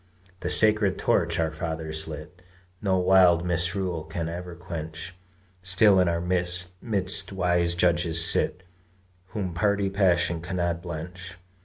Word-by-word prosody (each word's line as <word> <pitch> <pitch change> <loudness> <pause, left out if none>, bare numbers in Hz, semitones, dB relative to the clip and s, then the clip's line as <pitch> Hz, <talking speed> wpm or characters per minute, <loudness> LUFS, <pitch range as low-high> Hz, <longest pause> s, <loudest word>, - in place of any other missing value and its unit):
The 90 - -3
sacred 105 +1 +3
torch - - +1
our 80 -1 0
fathers 80 -1 -4
lit 80 +3 -9 0.4
No 95 -3 +1
wild 90 -2 +5
misrule 90 0 0
can 80 +1 -4
ever 90 +1 -7
quench; 85 0 -7 0.5
Still 95 +2 +4
in 90 - +3
our 85 0 0
midst 90 +2 -1
wise 90 -2 +1
judges 85 -1 +2
sit, 90 +2 0 0.6
Whom 95 -3 -4
party 100 +2 +1
passion 85 -4 +2
cannot 85 -1 -2
blench. 90 +2 -7
90 Hz, 125 wpm, -26 LUFS, 85-95 Hz, 0.6 s, wild